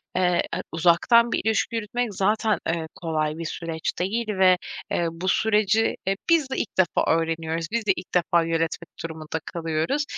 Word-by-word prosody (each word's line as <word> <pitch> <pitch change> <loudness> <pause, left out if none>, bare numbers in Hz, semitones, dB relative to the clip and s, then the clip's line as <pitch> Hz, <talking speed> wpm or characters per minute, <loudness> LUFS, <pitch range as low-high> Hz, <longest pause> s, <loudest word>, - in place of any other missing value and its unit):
eee, 180 -1 +3 0.2
ı - - -2
uzaktan 180 +8 +4
bir - - 0
ilişki 220 +1 +1
yürütmek 225 +1 -2
zaten, 215 +3 +2
eee, 165 -1 -1
kolay 155 -2 -2
bir 165 - -5
süreç 160 0 -3
değil 220 +6 -1
ve, 190 -3 +4 0.3
eee, 170 - +1
bu 170 +3 -6
süreci, 215 +1 +2
eee, 195 - +2
biz 315 -5 +3
de 265 - -3
ilk - - -3
defa 185 -2 +2
öğreniyoruz, 165 0 -1
biz 230 -1 -1
de 200 - +4
ilk 180 - -9
defa 170 -1 +3
yönetmek 165 0 -2
durumunda 160 -1 -5
kalıyoruz. 165 - -1
180 Hz, 170 wpm, -24 LUFS, 165-215 Hz, 0.3 s, uzaktan